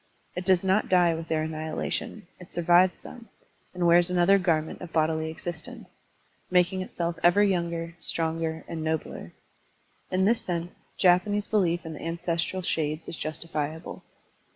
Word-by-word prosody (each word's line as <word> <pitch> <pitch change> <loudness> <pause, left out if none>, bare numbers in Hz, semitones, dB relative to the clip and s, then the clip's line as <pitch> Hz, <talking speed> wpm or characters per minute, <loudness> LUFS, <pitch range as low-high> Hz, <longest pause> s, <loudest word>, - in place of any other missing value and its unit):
It 180 - -4
does 185 -1 +4
not 190 +3 +2
die 175 -2 +4
with 165 0 -5
their 155 -1 0
annihilation, 160 +6 -4
it 180 - -13
survives 175 +2 +3
them, 240 -2 -11 0.4
and 180 -1 -2
wears 170 +1 +5
another 180 +2 +4
garment 160 -4 0
of 175 -2 -8
bodily 160 0 +1
existence, 180 +7 -6 0.6
making 180 +1 +2
itself 170 -2 -3
ever 175 +4 +5
yotinger, 170 -3 -1
stronger, 160 -1 -2
and 160 -1 -5
nobler. 160 0 -3 0.8
In 185 +1 +2
this 230 +3 +3
sense, 175 0 -3 0.3
Japanese 205 +3 +3
belief 175 -6 +1
in 160 - -5
the - - -9
ancestral 170 +2 -2
shades 155 -2 -1
is - - -4
justifiable. 155 0 -4
170 Hz, 145 wpm, -27 LUFS, 160-185 Hz, 0.8 s, wears